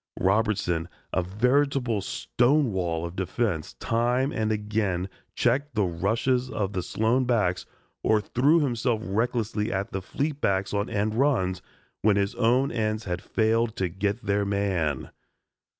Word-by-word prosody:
Robertson, 95 -4 +1 0.2
a 95 - +2
veritable 125 +4 +1
stonewall 95 - +1
of 85 +1 -7
defense, 95 -2 -2
time 125 +4 +1
and 110 -1 -1
again 105 -3 -1 0.3
checked 140 0 +1
the 105 - +3
rushes 115 +9 0
of 100 -4 -2
the 90 - -1
Sloan 115 +8 +1
backs 105 -8 +1 0.3
or 110 - +3
threw 140 +10 +3
himself 120 -4 0
recklessly 110 0 -1
at 95 +1 -2
fleet 145 +6 -3
backs 95 +1 +1
on 100 0 0
end 105 +1 0
runs 110 - +1 0.4
when 105 -1 +4
his 100 +2 +1
own 125 +3 +2
ends 110 -1 -1
had 90 -3 -3
failed 115 +2 +1
to 95 -6 -1
"get 100 +5 -2
their 100 0 +1
man." 95 -8 -1
110 Hz, 135 wpm, -26 LUFS, 95-120 Hz, 0.4 s, when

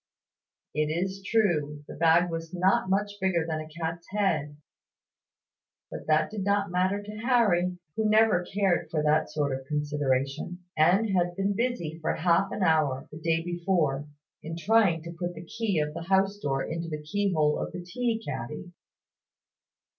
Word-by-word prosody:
It 155 0 +1
is 190 +4 -2
true, 155 -10 +1
the - - -8
bag 170 +2 +3
was 165 +1 -5
not 185 +1 +2
much 205 +2 +1
bigger 180 -4 +1
than 160 -1 -2
a 155 - -6
cat's 165 +1 -5
head; 165 -8 0 1.3
but - - -7
that 155 +4 +2
did 210 -3 -3
not 200 -1 +1
matter 185 +3 +1
to 210 +1 -8
Harry, 210 -7 +2 0.2
who 220 -1 +1
never 215 -4 +4
cared 190 -1 0
for 155 -2 -1
that 150 +1 +2
sort 145 -3 -1
of 135 0 -8
consideration, 145 +3 -1
and 185 +8 +4
had 175 -2 +1
been 195 +2 0
busy 185 -10 -2
for - - 0
half 180 +3 +2
an 200 - -2
hour, 155 -6 +2
the 150 - -8
day 165 0 0
before, 170 -5 0 0.3
in 165 +1 -6
trying 185 -3 +3
to 170 - -7
put 175 +1 -4
the 165 +2 -9
key 215 0 -2
of 150 -1 0
the 165 - -7
house 195 +1 +2
door 135 -6 -1
into 165 +1 -4
the 150 -1 -5
key 200 +6 0
hole 150 -3 +2
of - - -3
the 180 0 -6
tea 225 +5 -1
caddy. 150 +8 -5
175 Hz, 170 wpm, -28 LUFS, 155-195 Hz, 1.3 s, never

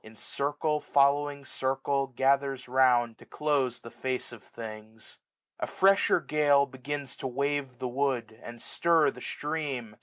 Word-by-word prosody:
In 110 +1 -13
circle 145 +6 -1
following 140 0 +2
circle, 135 +1 -1
gathers 135 0 +1
round. 125 -3 +3
To - - -14
close 140 -5 0
the 115 - -10
face 130 -1 -3
of 120 -3 -11
things. 110 0 -10 0.4
A - - -2
fresher 195 +1 +4
gale 145 -2 +3
Begins 140 +1 -5
to - - -4
wave 140 0 -2
the 130 - -3
wood, 125 -4 -1
and 120 0 -9
stir 165 -1 +2
the 125 - -12
stream. 140 -9 -4
135 Hz, 145 wpm, -29 LUFS, 125-145 Hz, 0.4 s, fresher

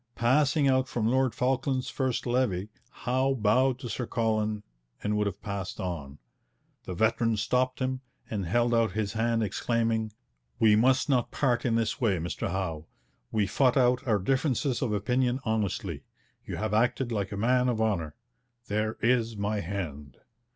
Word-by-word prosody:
Passing 140 +4 +3
out 130 -1 +3
from 115 -4 -2
Lord 130 -1 +2
Falkland's 130 0 0
first 130 -3 -1
levee, 120 -6 0 0.2
Howe 130 +2 0
bowed 125 +3 +2
to 130 -2 -7
Sir 120 +1 -3
Colin 110 -2 0 0.4
and 105 0 0
would 105 0 +1
have 100 0 -6
passed 100 -2 -4
on. 75 -7 -5 0.7
The 90 - -5
veteran 110 +3 +2
stopped 125 +4 +1
him, 130 0 -2 0.3
and 100 -5 -3
held 120 +5 +2
out 115 -1 +2
his 105 -2 -2
hand, 115 0 +1
exclaiming, 115 +1 0 0.5
'We 105 -2 +5
must 130 +5 +3
not 125 -5 +2
part 125 -4 0
in 115 -2 +2
this 115 +4 -1
way, 105 -6 +2
Mr 85 +1 -3
Howe. 80 -4 -3 0.4
We 105 -2 +2
fought 125 +6 +2
out 125 +1 +3
our 110 -3 +3
differences 130 +3 0
of 125 - 0
opinion 125 +5 +1
honestly. 100 - -1 0.5
You - - -4
have 110 0 -2
acted 120 +3 +1
like 100 -3 -2
a 100 - -4
man 125 +4 +2
of 115 -3 -1
honour. 95 -9 0 0.5
There 105 +1 -1
is 115 -2 +2
my 105 +1 -1
hand.' 80 -8 -5
115 Hz, 165 wpm, -28 LUFS, 105-125 Hz, 0.7 s, We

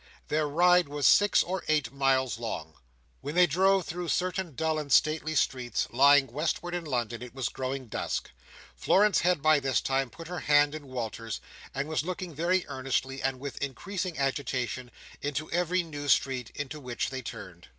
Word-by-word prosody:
Their 150 0 +1
ride 175 +2 +4
was 145 -1 -2
six 205 -1 +5
or 185 +1 -3
eight 150 -3 +1
miles 135 -3 +1
long. 80 -9 -5 0.5
When 145 - -6
they 180 0 +7
drove 190 +3 +3
through 175 +1 -5
certain 180 -3 -1
dull 160 +1 0
and 145 -2 -6
stately 155 +2 +3
streets, 125 -4 0
lying 140 +3 +6
westward 155 +6 -2
in 175 -1 -3
London, 120 -5 -2
it 125 0 -9
was 130 -2 -1
growing 130 0 -4
dusk. 110 - -3 0.4
Florence 205 +1 +3
had, 175 -4 +1
by 155 -1 +5
this 135 -2 +1
time, 135 -1 0
put 165 +6 -11
her 180 0 -4
hand 145 0 +4
in 155 -2 -8
Walter's; 115 -3 -5 0.4
and 135 +2 -2
was 155 0 0
looking 180 0 -5
very 175 +4 +1
earnestly, 135 0 -2
and 135 -1 -1
with 135 -3 -7
increasing 175 +6 -4
agitation, 130 -2 -2 0.3
into 145 +2 -3
every 180 +1 +1
new 145 -3 -7
street 130 -2 +2
into 145 +1 -5
which 125 -2 -3
they 130 -1 -4
turned. 100 -8 -9
145 Hz, 175 wpm, -28 LUFS, 130-170 Hz, 0.5 s, they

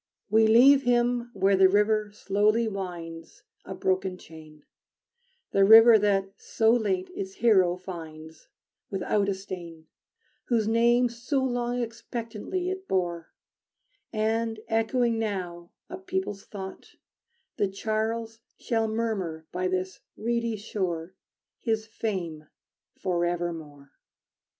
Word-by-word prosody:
We 220 0 +5
leave 265 +5 +7
him 245 -1 +1
where 195 0 +3
the 190 0 +6
river 210 +1 +2
slowly 210 +3 +1
winds, 175 -5 -7 0.2
A 190 - -6
broken 185 0 -1
chain; 155 -3 -14 0.9
The 195 - +4
river 225 +2 +9
that 195 -1 +1
so 225 0 +2
late 195 -6 0
its 190 0 -5
hero 190 -7 +4
finds, 160 -3 -10 0.4
Without 200 +1 0
a 195 - 0
stain, 175 -4 -9 0.6
Whose 225 -3 +1
name 235 +2 +4
so 245 +4 -2
long 245 -1 -1
expectantly 230 - -5
it 380 0 -6
bore; 175 - -2 0.8
And, 225 0 -1
echoing 225 +1 +1
now 180 -5 -4 0.2
a 360 +2 -8
people's 375 - -4
thought, 190 -2 -9 0.6
The 205 - +2
Charles 220 +3 -3 0.2
shall 225 -2 -1
murmur 210 -8 -3
by 185 +1 -1
this 185 0 -3 0.2
reedy 235 0 -1
shore 185 -5 -4 0.5
His 220 -2 -1
fame 180 -9 -4 0.5
forevermore. 170 -5 -3
210 Hz, 110 wpm, -27 LUFS, 185-230 Hz, 0.9 s, river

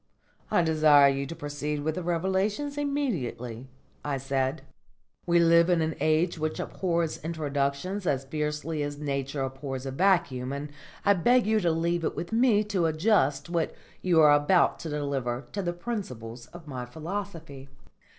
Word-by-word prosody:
"I 175 -5 +3
desire 155 -3 +6
you 135 0 -2
to 165 - -6
proceed 145 -1 -4
with 155 +1 0
the 185 - -4
revelations 190 - -1
immediately," 165 - -3 0.4
I 145 -2 -1
said. 135 +2 -1 0.6
"We 170 0 +4
live 170 0 +5
in 175 -2 +3
an 160 0 0
age 160 +2 +1
which 155 0 -2
abhors 170 -5 -2
introductions 155 +4 -2
as 135 -1 0
fiercely 150 +2 -3
as 145 0 -3
Nature 140 -1 -2
abhors 135 0 -5
a 135 - -3
vacuum, 140 -6 +1
and 145 +1 -5 0.3
I 200 - +6
beg 240 +6 +3
you 220 0 +3
to 175 -4 +1
leave 170 +1 0
it - - -1
with 170 - -5
me 225 -2 +4
to 195 -5 0
adjust 155 -3 +2
what 170 -2 -1 0.3
you 175 -3 +3
are 150 -1 +7
about 145 +5 +3
to 165 - -6
deliver 140 -4 -2
to 200 - -3
the 175 -2 -1
principles 125 - -6
of 175 +2 -12
my 130 -4 -5
philosophy." 160 - -6
155 Hz, 160 wpm, -27 LUFS, 140-180 Hz, 0.6 s, are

